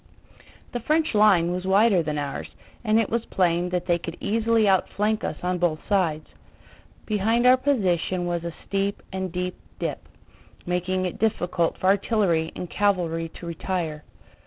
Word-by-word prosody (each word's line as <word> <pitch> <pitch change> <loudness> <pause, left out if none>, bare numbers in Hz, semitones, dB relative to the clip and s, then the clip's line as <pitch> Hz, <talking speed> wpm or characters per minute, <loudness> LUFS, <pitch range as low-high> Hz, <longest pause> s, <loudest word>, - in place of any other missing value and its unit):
The 245 - -3
French 310 +5 +1
line 200 -5 +5
was 180 0 -3
wider 195 0 +4
than 150 -1 -3
ours, 145 -1 -4 0.3
and 215 -1 +3
it 225 - 0
was 235 0 0
plain 175 -1 +1
that 180 -1 -2
they 175 -1 +2
could 170 0 -7
easily 225 0 +2
outflank 210 +3 +1
us - - -3
on 180 0 0
both 165 -3 -1
sides. 170 -7 +1 0.8
Behind 225 +3 +1
our 250 +1 +8
position 190 - 0
was 175 -1 -2
a 170 - -3
steep 200 0 -2
and 190 -1 -3
deep 180 +1 -3 0.2
dip, - - -3 0.7
making 180 +1 -1
it 180 - -4
difficult 180 -6 0
for - - -5
artillery 190 -4 +2
and 180 - -5
cavalry 175 -5 0
to - - -9
retire. 165 -2 -3
185 Hz, 160 wpm, -25 LUFS, 170-215 Hz, 0.8 s, our